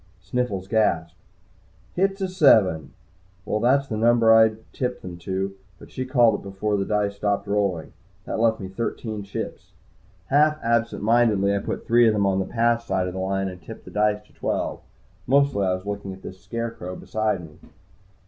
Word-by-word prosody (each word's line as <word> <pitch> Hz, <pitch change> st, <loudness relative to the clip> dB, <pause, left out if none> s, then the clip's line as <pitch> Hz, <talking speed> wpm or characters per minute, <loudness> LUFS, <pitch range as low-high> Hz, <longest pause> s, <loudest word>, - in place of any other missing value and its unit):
Sniffles 105 Hz, -7 st, -3 dB
gasped, 85 Hz, -7 st, +1 dB, 0.8 s
"Hit's 195 Hz, +2 st, 0 dB
a 190 Hz, -, 0 dB
seven!" 105 Hz, -, +4 dB, 0.5 s
Well, 105 Hz, -, -1 dB
that's 135 Hz, +4 st, +3 dB
the 110 Hz, -, -3 dB
number 115 Hz, 0 st, +5 dB
I'd 110 Hz, -1 st, +5 dB, 0.2 s
tipped 125 Hz, -1 st, -3 dB
them 90 Hz, -1 st, -7 dB
to, 95 Hz, +3 st, -3 dB, 0.2 s
but -, -, -15 dB
she 130 Hz, 0 st, -4 dB
called 120 Hz, -5 st, +4 dB
it -, -, -13 dB
before 100 Hz, +2 st, -2 dB
the 100 Hz, -1 st, 0 dB
dice 105 Hz, -1 st, -1 dB
stopped 100 Hz, 0 st, 0 dB
rolling. 100 Hz, -5 st, -1 dB, 0.3 s
That -, -, -3 dB
left 110 Hz, -1 st, +2 dB
me 95 Hz, -, -5 dB
thirteen 110 Hz, +2 st, -4 dB
chips. 100 Hz, 0 st, -7 dB, 0.6 s
Half 150 Hz, +2 st, +4 dB
absent 115 Hz, -2 st, 0 dB
mindedly, 105 Hz, -3 st, +3 dB
I -, -, 0 dB
put -, -, -5 dB
three 120 Hz, 0 st, +5 dB
of 110 Hz, -, +4 dB
them 100 Hz, -1 st, +1 dB
on 95 Hz, -1 st, +2 dB
the 95 Hz, -, -1 dB
"Pass" 115 Hz, 0 st, +1 dB
side 95 Hz, -5 st, -1 dB
of 90 Hz, -, -5 dB
the 95 Hz, -, -5 dB
line 95 Hz, +1 st, -1 dB
and 90 Hz, -1 st, -8 dB
tipped 115 Hz, -, -11 dB
the -, -, -11 dB
dice 105 Hz, 0 st, +1 dB
to -, -, -26 dB
twelve. -, -, -3 dB, 0.5 s
Mostly 135 Hz, -6 st, +3 dB
I 90 Hz, -, +2 dB
was 95 Hz, +1 st, -9 dB
looking 100 Hz, -1 st, -4 dB
at 95 Hz, -, -14 dB
this 95 Hz, +1 st, -9 dB
scarecrow 115 Hz, -6 st, -5 dB
beside 110 Hz, -5 st, -2 dB
me. 75 Hz, -, -19 dB
105 Hz, 185 wpm, -24 LUFS, 95-115 Hz, 0.8 s, number